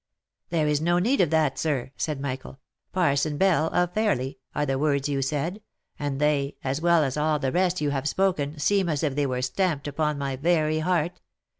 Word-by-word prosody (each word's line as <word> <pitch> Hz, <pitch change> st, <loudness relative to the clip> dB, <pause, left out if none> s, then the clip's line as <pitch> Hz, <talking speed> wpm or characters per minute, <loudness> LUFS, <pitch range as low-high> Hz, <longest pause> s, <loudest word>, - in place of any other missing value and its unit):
" -, -, -57 dB
There 160 Hz, -3 st, +1 dB
is 150 Hz, 0 st, +1 dB
no 175 Hz, +2 st, +2 dB
need 240 Hz, +10 st, +2 dB
of 175 Hz, -, +3 dB
that, 155 Hz, -3 st, +1 dB
sir," 140 Hz, -5 st, -1 dB
said 150 Hz, -3 st, -2 dB
Michael; 130 Hz, -1 st, -5 dB, 0.2 s
" -, -, -56 dB
Parson 150 Hz, -4 st, +1 dB
Bell, 170 Hz, -4 st, +3 dB
of 180 Hz, +1 st, 0 dB
Fairly, 170 Hz, -, 0 dB, 0.2 s
are 145 Hz, -, +1 dB
the 135 Hz, -1 st, -1 dB
words 140 Hz, -2 st, +1 dB
you 140 Hz, -1 st, -1 dB
said, 155 Hz, +9 st, -2 dB, 0.4 s
and 145 Hz, -2 st, -2 dB
they, 145 Hz, -1 st, +1 dB
as 135 Hz, +3 st, -2 dB
well 170 Hz, -2 st, +4 dB
as 135 Hz, 0 st, -2 dB
all 150 Hz, 0 st, +2 dB
the 135 Hz, -2 st, -1 dB
rest 180 Hz, +1 st, +1 dB
you 145 Hz, -1 st, +1 dB
have 140 Hz, +1 st, -1 dB
spoken, 155 Hz, -5 st, 0 dB
seem 190 Hz, +5 st, +2 dB
as 150 Hz, -1 st, -1 dB
if 145 Hz, -3 st, +1 dB
they 145 Hz, 0 st, 0 dB
were 125 Hz, -1 st, -2 dB
stamped 145 Hz, +2 st, -1 dB
upon 150 Hz, +1 st, -1 dB
my 140 Hz, -1 st, -2 dB
very 155 Hz, +1 st, +2 dB
heart. 175 Hz, +1 st, 0 dB
150 Hz, 210 wpm, -26 LUFS, 140-170 Hz, 0.4 s, well